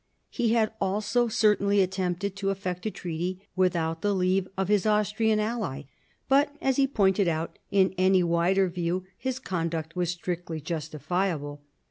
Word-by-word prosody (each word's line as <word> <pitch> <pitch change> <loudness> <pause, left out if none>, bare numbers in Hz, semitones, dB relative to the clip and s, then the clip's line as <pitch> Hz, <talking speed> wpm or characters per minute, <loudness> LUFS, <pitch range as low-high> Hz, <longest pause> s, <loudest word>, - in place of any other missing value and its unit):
He 235 -3 +1
had 220 -2 +2
also 210 +5 +1
certainly 210 -3 +3
attempted 190 0 -1
to 195 -1 -1
effect 185 0 -3
a - - +1
treaty 180 +1 -5
without 165 -3 +1
the 205 -1 +1
leave 185 0 +1
of 190 -1 0
his 210 0 +2
Austrian 215 +1 +2
ally. 210 - -2 0.4
But, 285 +2 +3
as 265 -1 +1
he 275 -1 +4
pointed 200 -6 +2
out, 160 0 -2
in 190 -1 +3
any 185 0 +4
wider 175 +3 +2
view 175 +1 -2
his 260 -1 -3
conduct 165 -7 -3
was 175 -2 0
strictly 175 -2 -4
justifiable. 155 0 -3
190 Hz, 150 wpm, -27 LUFS, 170-210 Hz, 0.4 s, he